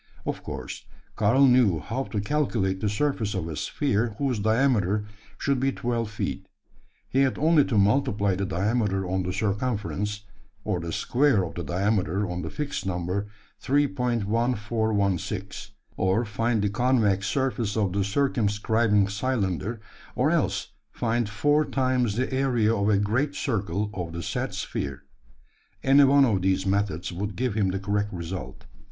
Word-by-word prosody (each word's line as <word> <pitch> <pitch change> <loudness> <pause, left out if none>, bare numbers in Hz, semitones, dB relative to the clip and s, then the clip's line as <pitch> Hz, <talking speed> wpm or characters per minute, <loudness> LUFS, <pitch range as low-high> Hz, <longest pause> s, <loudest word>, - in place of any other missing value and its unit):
Of - - -3
course, - - -7 0.3
Karl 115 +6 +4
knew 125 -9 +5
how 115 - -3
to 105 - -3
calculate 105 -6 0
the 105 - +1
surface 110 -2 -1
of 85 -4 -2
a 80 - -5
sphere 115 - -1
whose 130 -4 0
diameter 110 -3 +2 0.3
should 140 -2 0
be 135 +1 +1
twelve 120 -3 -2
feet. 105 - -4 0.6
He 135 - 0
had 135 -1 +2
only 155 0 +4
to 115 - 0
multiply 100 -1 +2
the 95 +1 -2
diameter 95 +1 0
on 95 +1 0
the 90 0 -2
circumference; 105 0 -2 0.4
or 90 - -1
the 85 0 -5
square 125 - +2
of 80 -4 -5
the 85 - -5
diameter 95 +4 0
on 90 0 -4
the 80 - -4
fixed 150 - -4
number 95 +2 -2 0.3
3.1416; 110 -7 0 0.3
or 95 +6 +1
find 110 +1 0
the 105 - +2
convex 105 -4 +2
surface 120 -3 -1
of 100 -4 +1
the 100 0 +1
circumscribing 105 -2 +2
cylinder; 105 -1 -2 0.4
or - - +2
else - - 0 0.2
find 115 -1 -1
four 145 +8 +2
times 130 -6 0
the 130 +3 -1
area 125 -5 +2
of 100 -1 +1
a 105 - +4
great 125 +9 0
circle 105 - -1
of 85 -4 -5
the 85 0 -5
said - - -3
sphere. 70 0 -4 0.8
Any 140 +1 +6
one 140 0 +6
of 105 -7 +1
these 95 +1 +1
methods 95 -4 0
would 100 +4 -4
give 125 -3 -1
him 100 -3 +1
the 95 - -1
correct 100 +1 -1
result. 90 +1 -6
105 Hz, 155 wpm, -26 LUFS, 95-125 Hz, 0.8 s, Any